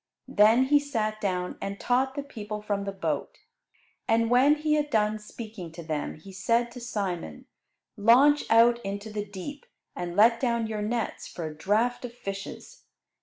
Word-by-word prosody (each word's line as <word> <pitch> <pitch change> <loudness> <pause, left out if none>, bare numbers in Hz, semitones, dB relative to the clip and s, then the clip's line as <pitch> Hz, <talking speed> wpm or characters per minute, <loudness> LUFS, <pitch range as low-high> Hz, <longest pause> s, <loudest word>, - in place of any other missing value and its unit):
Then 220 +5 +5
He 290 +2 +4
sat 215 -7 -2
down 180 -3 -2
and 195 0 -4
taught 265 +2 +1
the 285 - -3
people 210 -6 -6
from 205 -1 -2
the 200 - -2
boat. 195 0 -3 0.7
And 230 0 +2
when 265 +4 +6
He 305 0 0
had 295 -1 +1
done 215 -3 +1
speaking 210 -5 -9
to 170 0 -8
them 155 -2 -3
He 175 +6 -13
said 230 +5 +1
to 245 - -9
Simon, 190 - -4 0.5
"Launch 260 +8 +5
out 235 +1 +5
into 200 +2 -5
the 210 -1 -4
deep, 240 +9 -8 0.3
and 175 -1 -4
let 230 +3 +5
down 235 -3 0
your 215 -1 -3
nets 225 +2 -2
for 170 - -6
a 155 -1 -6
draught 220 +10 0
of 240 -1 -9
fishes." 195 - -8
220 Hz, 170 wpm, -27 LUFS, 200-245 Hz, 0.7 s, when